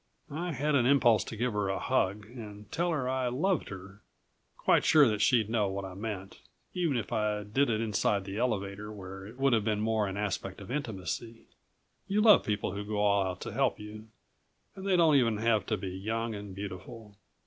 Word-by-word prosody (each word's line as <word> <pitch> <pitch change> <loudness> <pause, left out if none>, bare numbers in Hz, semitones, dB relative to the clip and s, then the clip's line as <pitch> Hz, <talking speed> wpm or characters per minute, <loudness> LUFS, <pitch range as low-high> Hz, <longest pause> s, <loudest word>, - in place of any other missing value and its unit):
I 170 +4 -3
had 150 +3 0
an 125 -4 +4
impulse 125 -5 +5
to - - -6
give 120 +1 -1
her 105 -1 0
a 95 - -1
hug 100 +3 0
and 105 -3 -10
tell 175 +1 0
her 145 -6 -1
I 130 -1 0
loved 155 - 0
her, 95 +2 -10 0.6
quite - - +3
sure 150 -3 +6
that 105 -2 0
she'd 115 -4 +4
know 110 -2 +1
what 95 0 -4
I 95 - -7
meant, 95 -1 -6 0.3
even 170 -7 0
if 115 - -4
I 105 -1 0
did 125 +7 +1
it 110 -1 0
inside 105 -2 0
the 100 +2 -5
elevator 105 -3 -2
where 95 -1 -8
it 115 +4 -12
would 135 -1 +3
have 110 -1 +1
more 110 -1 +1
an 95 0 -4
aspect 100 -2 -3
of 100 +3 -9
intimacy. 115 - -4 0.6
You 200 +2 +1
love 215 -1 +7
people 105 -3 -1
who 100 +2 -4
go 105 0 -4
all 100 -1 +3
out 90 0 -5
to - - -5
help 135 +2 +1
you 105 +1 -9 0.7
and 195 0 -6
they 190 - +3
don't 160 -4 +5
even 115 -5 +2
have 110 -2 +1
to 110 - 0
be 95 0 -5
young 110 +5 -3
and 100 -2 -7
beautiful. 100 +3 -8
110 Hz, 205 wpm, -30 LUFS, 100-125 Hz, 0.7 s, love